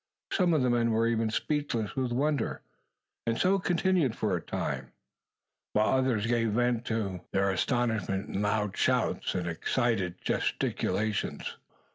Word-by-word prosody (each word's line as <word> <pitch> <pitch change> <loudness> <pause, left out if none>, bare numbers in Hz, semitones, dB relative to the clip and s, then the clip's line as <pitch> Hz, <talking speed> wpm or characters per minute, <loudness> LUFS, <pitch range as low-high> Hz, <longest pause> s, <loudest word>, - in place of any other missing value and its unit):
Some 180 -5 +3
of 145 - +2
the 125 - +3
men 120 -1 +2
were 115 0 +2
even 115 -1 +1
speechless 120 -3 -1
with 130 -2 -1
wonder, 140 0 0 0.6
and 115 0 +1
so 195 +2 +3
continued 175 - +2
for 105 -4 0
a 85 - -2
time, - - -4 0.8
while 110 +4 +3
others 120 -5 +1
gave 115 -2 +1
vent 120 0 +1
to 100 -5 -2
their 95 0 +2
astonishment 110 -2 0
in 100 - -2
loud 105 -1 0
shouts - - +1
and 90 -1 -1
excited 95 +1 0
gesticulations. 110 -1 -1
115 Hz, 140 wpm, -29 LUFS, 105-130 Hz, 0.8 s, Some